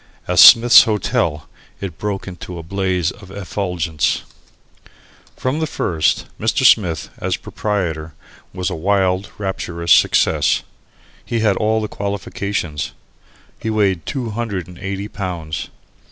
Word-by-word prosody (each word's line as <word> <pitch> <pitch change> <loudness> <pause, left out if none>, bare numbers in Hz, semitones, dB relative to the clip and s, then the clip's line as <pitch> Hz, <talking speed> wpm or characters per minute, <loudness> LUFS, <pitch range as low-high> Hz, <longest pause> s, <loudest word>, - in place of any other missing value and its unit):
As - - +1
"Smith's 120 +2 +9
Hotel" 95 -8 -1 0.3
it 90 -6 -6
broke 100 -2 -3
into 90 -1 -8
a 85 - -7
blaze 95 -1 -1
of 95 -2 -14
effulgence. 90 -6 -2 1.1
From 130 +4 -1
the 160 - -1
first, 80 - 0
Mr. 110 +4 +1
Smith, 90 -10 +3
as - - -1
a - - -11
proprietor, 85 -7 -3 0.4
was 90 0 -3
a - - -3
wild, 95 +2 +1
rapturous 85 -4 -3
success. 75 -3 +4 0.6
He 115 -1 -2
had 105 -3 +3
all 110 +2 +1
the - - -2
qualifications. 100 -6 -4 0.7
He 110 - -3
weighed 100 -6 0
two 125 -6 -3
hundred 105 -6 -3
and 90 -1 -13
eighty 100 +1 -4
pounds. 85 -7 -5
95 Hz, 130 wpm, -19 LUFS, 85-105 Hz, 1.1 s, Smith's